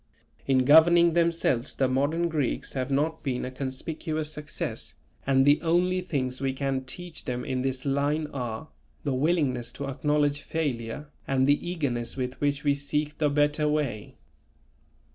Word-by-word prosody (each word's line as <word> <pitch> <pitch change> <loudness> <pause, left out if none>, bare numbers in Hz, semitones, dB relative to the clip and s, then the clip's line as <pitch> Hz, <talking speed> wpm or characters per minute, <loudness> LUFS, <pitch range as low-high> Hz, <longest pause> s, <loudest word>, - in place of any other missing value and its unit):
In 130 -2 +3
governing 170 +3 +7
themselves 165 -7 +1
the 135 - +2
modern 145 +6 +1
Greeks 150 -6 -2
have 130 -1 -2
not 150 +4 0
been 130 -4 -2
a 130 - -5
conspicuous 150 +4 -4
success, 150 0 -5 0.3
and 135 -1 +4
the 145 +1 +5
only 180 +2 +2
things 130 -7 -3
we 135 -1 0
can 135 -1 -2
teach 175 +5 -6
them 125 0 -3
in 130 -1 -1
this 130 0 -2
line 145 +3 +1
are, 125 +2 -4 0.3
the 140 - 0
willingness 130 -5 +1
to 140 - -5
acknowledge 145 +1 +1
failure 145 -2 -3 0.2
and 130 -1 +2
the 145 +5 +2
eagerness 130 -10 -2
with 125 0 -4
which 145 0 0
we 145 -1 +3
seek 150 +1 -2
the 150 -2 +3
better 150 +1 +2
way. 140 -9 -2
145 Hz, 155 wpm, -27 LUFS, 130-155 Hz, 0.3 s, governing